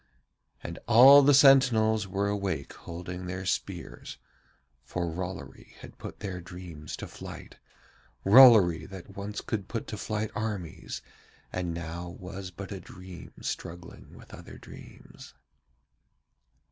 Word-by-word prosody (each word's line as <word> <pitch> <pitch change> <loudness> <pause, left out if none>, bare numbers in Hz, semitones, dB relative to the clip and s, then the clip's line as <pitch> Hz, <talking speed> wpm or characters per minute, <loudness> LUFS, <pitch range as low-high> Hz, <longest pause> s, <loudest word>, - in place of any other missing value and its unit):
And 85 - -7
all 130 +5 +9
the 145 +1 +5
sentinels 120 -7 +5
were 100 +1 -1
awake 100 -8 -3
holding 90 +1 -8
their 90 +1 -5
spears, - - -4 0.7
for 90 -1 -3
Rollory 95 +3 -7
had - - -13
put - - -9
their 95 -3 -5
dreams 85 -3 -9
to - - -7
flight, - - -11 0.7
Rollory 100 -8 +7
that 95 0 -11
once 105 +1 -5
could 100 -3 -4
put 115 - -4
to 110 - -6
flight 110 +1 -3
armies 105 -7 -5 0.5
and 90 -1 -2
now 85 +1 -6
was 95 0 -7
but 95 +2 -9
a 100 - -5
dream 90 0 -12
struggling 90 +1 -7
with - - -15
other - - -11
dreams. - - -14
95 Hz, 125 wpm, -28 LUFS, 90-110 Hz, 0.7 s, all